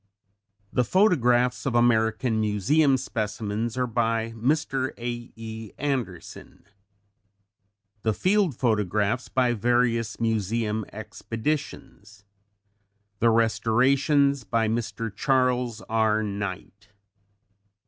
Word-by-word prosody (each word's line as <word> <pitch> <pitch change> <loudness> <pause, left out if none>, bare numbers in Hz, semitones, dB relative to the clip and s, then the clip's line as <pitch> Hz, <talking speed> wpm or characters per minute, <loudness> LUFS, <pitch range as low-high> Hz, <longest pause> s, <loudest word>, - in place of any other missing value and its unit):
The 125 - +3
photographs 125 - +2
of 125 - -1
American 110 -1 +2
Museum 130 +8 +2
specimens 110 -1 -3
are 125 - +1
by 115 -1 -1
Mr. 130 +3 -1
A.E. 115 -2 -7
Anderson; 125 - -5 1.4
the 110 - +1
field 185 - +1
photographs 105 0 0
by 125 -2 +2
various 115 0 +1
Museum 110 -1 -1
expeditions; 110 -3 -5 1.0
the 115 - +4
restorations 130 +5 +2
by 110 +2 0
Mr. 115 -1 -3
Charles 125 -3 +1
R. 110 -1 +1
Knight. 100 0 -6
115 Hz, 85 wpm, -25 LUFS, 110-125 Hz, 1.4 s, the